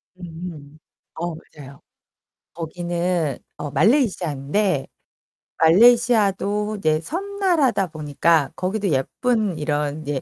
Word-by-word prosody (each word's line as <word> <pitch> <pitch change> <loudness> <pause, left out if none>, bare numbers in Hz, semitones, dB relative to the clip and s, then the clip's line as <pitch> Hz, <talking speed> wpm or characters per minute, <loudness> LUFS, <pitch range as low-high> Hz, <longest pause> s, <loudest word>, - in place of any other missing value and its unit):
음. 165 -4 -9 0.4
어 170 0 -4
맞아요. 140 -3 -14 0.7
거기는 170 -2 -2 0.2
어 145 - -5
말레이시아인데 180 - +1 0.7
말레이시아도 210 +1 +4
이제 155 -5 +1
섬나라다 345 - 0
보니까 155 -1 +1
거기도 200 +2 -2
예쁜 200 - 0
이런 150 0 -2
이제 145 -3 -3
170 Hz, 235 characters per minute, -22 LUFS, 150-210 Hz, 0.7 s, 말레이시아도